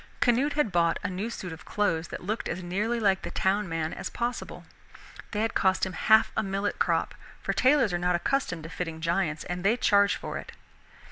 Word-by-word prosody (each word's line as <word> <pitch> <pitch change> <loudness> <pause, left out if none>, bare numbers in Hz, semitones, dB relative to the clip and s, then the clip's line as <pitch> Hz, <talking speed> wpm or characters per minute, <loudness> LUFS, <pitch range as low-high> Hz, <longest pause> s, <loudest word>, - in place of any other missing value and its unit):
Canute 280 +2 +3
had 295 -8 +1
bought 170 -2 +2
a - - -2
new 195 +5 -3
suit 185 -7 -6
of 160 - -11
clothes 170 -6 0
that - - -7
looked 215 +5 -3
as 185 - -4
nearly 210 +7 -1
like 195 -3 +2
the - - -5
town 195 0 0
man 165 -1 -2
as - - -5
possible. 240 +1 -4 0.7
They 210 - -2
had 225 +1 0
cost 190 0 +2
him 190 - -5
half 220 +4 +4
a - - +2
millet 195 0 -2
crop; - - +1 0.3
for - - 0
tailors 260 -6 +3
are 175 - 0
not 180 0 +2
accustomed 180 - -1
to 165 - -7
fitting 165 -2 -5
giants 165 -2 0
and 180 0 -4
they 215 +5 +3
charge 200 -3 +4
for - - -5
it. - - -10
195 Hz, 210 wpm, -28 LUFS, 175-220 Hz, 0.7 s, half